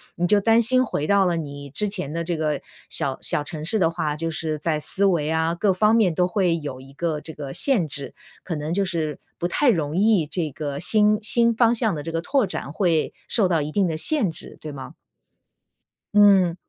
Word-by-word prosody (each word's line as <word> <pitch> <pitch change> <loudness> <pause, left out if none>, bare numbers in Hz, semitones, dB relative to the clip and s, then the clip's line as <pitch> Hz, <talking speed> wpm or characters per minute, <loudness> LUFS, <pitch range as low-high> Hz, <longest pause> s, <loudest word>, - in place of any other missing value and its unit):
你 175 - 0
就 210 +2 +4
担 225 +3 +3
心 255 +2 +4
回 150 - -3
到 200 -1 +3
了 175 -2 +1
你 145 -3 -7
之 210 +9 +1
前 150 -7 -4
的 170 0 -3
这 170 -1 -3
个 150 -2 -2 0.3
小 135 -1 0
小 150 - +1
城 155 0 -6
市 215 +6 +1
的 165 -3 +3
话， 160 -3 -2
就 165 +2 -3
是 155 -1 -3
在 155 0 -1
思 190 +6 -1
维 170 -6 +1
啊， 160 +1 0
各 190 +2 +1
方 210 +4 +2
面 205 -7 +3
都 180 - +2
会 180 -2 0
有 140 -4 -7
一 135 +1 -15
个 155 0 -3
这 160 - -10
个 140 -2 -7
限 225 - +2
制， 140 0 -4 0.3
可 170 - -4
能 150 +2 -4
就 200 - +1
是 160 -5 -3 0.2
不 175 - -2
太 280 +9 +2
容 160 -8 0
易 205 -5 +3
这 155 0 -3
个 145 0 -5
新 210 +5 +4
新 235 +1 +3
方 230 0 +3
向 220 -5 0
的 145 - -6
这 165 - -5
个 165 - -2
拓 265 +7 +1
展 140 - -6
会 170 -5 0
受 205 -6 +3
到 165 -4 +1
一 150 - -4
定 195 +1 +1
的 160 -1 -3
限 235 - +4
制， 160 - -10
对 155 - -7
吗？ 135 -2 -9 1.2
嗯。 195 -4 +5
170 Hz, 240 characters per minute, -22 LUFS, 155-205 Hz, 1.2 s, 嗯